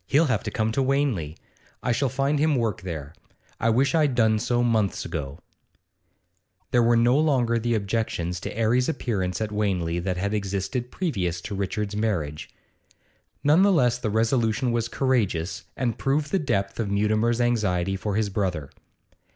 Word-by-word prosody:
'He'll 150 Hz, +4 st, +4 dB
have 130 Hz, -, 0 dB
to -, -, -4 dB
come 110 Hz, -1 st, -1 dB
to 135 Hz, -, 0 dB
Wanley. 130 Hz, -, 0 dB, 0.5 s
I -, -, +1 dB
shall 130 Hz, +3 st, +1 dB
find 140 Hz, +3 st, 0 dB
him 155 Hz, 0 st, +3 dB
work 115 Hz, -7 st, -1 dB
there 80 Hz, -5 st, -6 dB, 0.5 s
I 115 Hz, -, +2 dB
wish 130 Hz, +5 st, +2 dB
I'd 150 Hz, -5 st, +2 dB
done 110 Hz, -2 st, +3 dB
so 120 Hz, +1 st, +1 dB
months 110 Hz, -5 st, +1 dB
ago.' 70 Hz, 0 st, -5 dB, 1.3 s
There 120 Hz, -, +4 dB
were 120 Hz, 0 st, +4 dB
no 120 Hz, +4 st, +4 dB
longer 125 Hz, -7 st, +2 dB
the 120 Hz, +1 st, 0 dB
objections 100 Hz, -5 st, -2 dB
to 100 Hz, -, -6 dB
'Arry's 120 Hz, +4 st, +2 dB
appearance 100 Hz, -, -2 dB
at 110 Hz, -1 st, -2 dB
Wanley 90 Hz, -5 st, -1 dB
that 90 Hz, +1 st, -2 dB
had 100 Hz, +3 st, -1 dB
existed 100 Hz, +4 st, -2 dB
previous 95 Hz, -, -2 dB
to 105 Hz, -, -6 dB
Richard's 100 Hz, +1 st, -2 dB
marriage; 85 Hz, -9 st, -2 dB, 0.9 s
none 150 Hz, +5 st, +5 dB
the 200 Hz, +1 st, +5 dB
less 125 Hz, -8 st, +3 dB
the 120 Hz, -4 st, -2 dB
resolution 115 Hz, +2 st, +1 dB
was 115 Hz, -1 st, 0 dB
courageous, 110 Hz, -11 st, -1 dB
and 120 Hz, -3 st, -1 dB
proved 140 Hz, +2 st, 0 dB
the 195 Hz, -, +2 dB
depth 100 Hz, -, -1 dB
of 110 Hz, -3 st, -1 dB
Mutimer's 110 Hz, +3 st, +1 dB
anxiety 95 Hz, -6 st, +1 dB
for 100 Hz, +1 st, -3 dB
his 105 Hz, -2 st, 0 dB
brother. 90 Hz, -8 st, -2 dB
110 Hz, 165 wpm, -25 LUFS, 95-125 Hz, 1.3 s, none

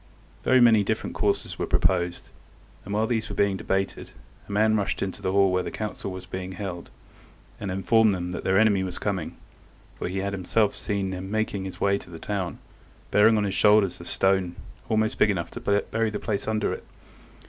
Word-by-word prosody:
Very 130 Hz, -, +4 dB
many 115 Hz, -4 st, +6 dB
different -, -, -2 dB
courses -, -, -1 dB
were -, -, -1 dB
proposed, 90 Hz, -2 st, 0 dB, 0.6 s
and 100 Hz, -, -7 dB
while 110 Hz, +1 st, +2 dB
these 110 Hz, -1 st, -1 dB
were -, -, -5 dB
being 100 Hz, -1 st, +2 dB
debated 95 Hz, +1 st, -2 dB, 0.4 s
a -, -, -6 dB
man 110 Hz, +2 st, +3 dB
rushed 100 Hz, -2 st, 0 dB
into 95 Hz, -1 st, -5 dB
the 95 Hz, -, -1 dB
hall 100 Hz, -1 st, +4 dB
where 90 Hz, 0 st, +2 dB
the -, -, -4 dB
council 105 Hz, -2 st, -5 dB
was 95 Hz, 0 st, -7 dB
held, 95 Hz, -1 st, -5 dB, 0.7 s
and 100 Hz, -, -4 dB
informed 95 Hz, +4 st, +3 dB
them 90 Hz, -2 st, -3 dB
that -, -, -5 dB
their 95 Hz, 0 st, +2 dB
enemy 105 Hz, -2 st, +4 dB
was 90 Hz, -1 st, -4 dB
coming, 95 Hz, -4 st, -3 dB, 0.6 s
for -, -, -5 dB
he 95 Hz, +2 st, -4 dB
had 100 Hz, +1 st, -2 dB
himself 100 Hz, +3 st, +1 dB
seen 100 Hz, -2 st, -2 dB
him 95 Hz, +1 st, -5 dB
making 105 Hz, -2 st, -1 dB
his 95 Hz, -, -7 dB
way 100 Hz, 0 st, +2 dB
to -, -, -14 dB
the 85 Hz, -, -8 dB
town, 95 Hz, 0 st, -3 dB, 0.5 s
bearing 110 Hz, +2 st, +5 dB
on 105 Hz, -, +1 dB
his 100 Hz, -2 st, -1 dB
shoulder 105 Hz, +1 st, +5 dB
a 95 Hz, -, -4 dB
stone 95 Hz, -2 st, +1 dB, 0.3 s
almost 110 Hz, 0 st, +1 dB
big 105 Hz, -, +5 dB
enough 90 Hz, -5 st, -2 dB
to -, -, -7 dB, 0.3 s
bury 115 Hz, 0 st, +1 dB
the 105 Hz, -, -3 dB
place 105 Hz, -1 st, -3 dB
under 110 Hz, -1 st, 0 dB
it. -, -, -7 dB
100 Hz, 200 wpm, -26 LUFS, 95-105 Hz, 0.7 s, many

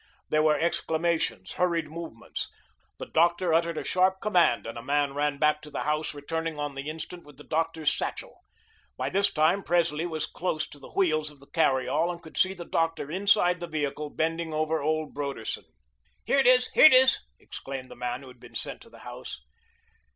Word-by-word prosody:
There 155 Hz, -, +3 dB
were 155 Hz, -1 st, +4 dB
exclamations, 165 Hz, -, 0 dB
hurried 170 Hz, -3 st, 0 dB
movements. 160 Hz, -7 st, -6 dB, 0.5 s
The -, -, -6 dB
doctor 170 Hz, +1 st, +2 dB
uttered 165 Hz, 0 st, +2 dB
a -, -, -2 dB
sharp 185 Hz, +1 st, +2 dB
command 175 Hz, -, +3 dB
and 115 Hz, +1 st, -6 dB
a 115 Hz, -, -6 dB
man 145 Hz, +2 st, 0 dB
ran 145 Hz, 0 st, 0 dB
back 150 Hz, +1 st, +2 dB
to 150 Hz, -, -10 dB
the -, -, -4 dB
house 150 Hz, 0 st, -1 dB
returning 160 Hz, +2 st, -3 dB
on 145 Hz, -1 st, -3 dB
the 135 Hz, +2 st, -5 dB
instant 160 Hz, +3 st, -6 dB
with 145 Hz, -2 st, -16 dB
the 150 Hz, -, -12 dB
doctor's 160 Hz, -1 st, 0 dB
satchel. -, -, -5 dB, 0.6 s
By 130 Hz, +2 st, -2 dB
this 200 Hz, +1 st, +2 dB
time, 160 Hz, +6 st, +3 dB
Presley 170 Hz, -2 st, +1 dB
was 160 Hz, -3 st, -3 dB
close 160 Hz, -4 st, -2 dB
to 145 Hz, -, -13 dB
the -, -, -12 dB
wheels 155 Hz, -5 st, +2 dB
of 145 Hz, -2 st, -16 dB
the 140 Hz, -, -16 dB
carry 135 Hz, -6 st, +2 dB
all 170 Hz, +2 st, +1 dB
and 170 Hz, -, -7 dB
could 160 Hz, -2 st, -14 dB
see 190 Hz, +1 st, +2 dB
the 175 Hz, -1 st, -8 dB
doctor 165 Hz, -3 st, -1 dB
inside 185 Hz, -1 st, +3 dB
the 175 Hz, -, -5 dB
vehicle 150 Hz, -1 st, -3 dB
bending 165 Hz, +1 st, -2 dB
over 155 Hz, 0 st, 0 dB
old 155 Hz, +1 st, -1 dB
Broderson. 140 Hz, -6 st, -4 dB, 0.6 s
"Here 275 Hz, -, +3 dB
it 265 Hz, -, +4 dB
is, 250 Hz, 0 st, +5 dB
here -, -, +8 dB
it 310 Hz, -, +10 dB
is," 260 Hz, +1 st, +6 dB, 0.2 s
exclaimed 135 Hz, -1 st, -8 dB
the -, -, -9 dB
man 125 Hz, +2 st, -4 dB
who -, -, -12 dB
had 125 Hz, -1 st, -14 dB
been -, -, -15 dB
sent -, -, -4 dB
to -, -, -14 dB
the -, -, -15 dB
house. -, -, -8 dB
155 Hz, 200 wpm, -27 LUFS, 145-170 Hz, 0.6 s, it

